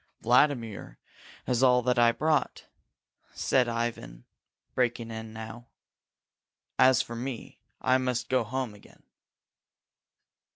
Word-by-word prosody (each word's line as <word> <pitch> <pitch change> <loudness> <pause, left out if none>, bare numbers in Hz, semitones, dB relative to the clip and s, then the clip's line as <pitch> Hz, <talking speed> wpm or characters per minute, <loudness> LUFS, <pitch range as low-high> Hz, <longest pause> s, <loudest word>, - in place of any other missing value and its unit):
"Vladimir 115 - +1 0.5
has 125 -1 0
all 125 -1 +5
that 125 0 +1
I 120 0 +6
brought," 155 +4 0 0.7
said 125 -2 +2
Ivan, 115 - -4 0.5
breaking 120 -2 -1
in 110 0 -7
now. 110 +2 -9 1.1
"As 130 0 +5
for 115 - -8
me, 125 +1 -6 0.2
I 130 0 +2
must 125 -2 -2
go 130 -2 +2 0.3
again." 105 - -19
120 Hz, 100 wpm, -28 LUFS, 115-130 Hz, 1.1 s, I